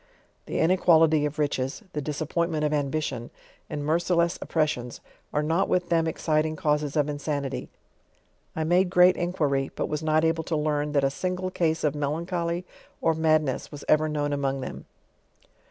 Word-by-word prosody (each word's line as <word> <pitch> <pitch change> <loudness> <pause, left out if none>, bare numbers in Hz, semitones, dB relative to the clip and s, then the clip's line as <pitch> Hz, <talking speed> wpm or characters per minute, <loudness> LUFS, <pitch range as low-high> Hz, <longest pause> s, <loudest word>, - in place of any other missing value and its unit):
Tl:e - - -2
inequality 160 -3 +4
of 145 - -8
riches, 140 - -1
the 150 - -2
disappointment 155 +2 -1
of 150 - 0
ambition, 140 -4 -2 0.4
and 145 - -4
mercileFB 170 +2 +1
ofprcEs'one. 150 -7 -1 0.3
are 150 - 0
not 165 +5 +1
with 180 -1 +1
them 165 -1 +2
exciting 155 0 0
caus 150 0 +1
es 145 -2 -5
of 150 -2 +2
insanity. 145 -2 -3 0.9
I 160 - -1
made 175 +3 +3
great 180 0 +6
inquiry, 150 -6 0
but - - -2
was 150 0 -2
not 155 0 +2
able 160 0 +1
to 165 - -1
learn, 150 -1 -1
that 140 -2 +2
a 135 - +2
single 185 +4 -3
case 160 -3 0
of 150 -3 +2
melancholy 170 +4 -2 0.3
or 165 - +2
madness 155 -4 +1
was 145 -1 -9
ever 155 0 +3
known 145 -1 -1
among 135 -1 -1
them. - - -7
155 Hz, 165 wpm, -26 LUFS, 145-170 Hz, 0.9 s, great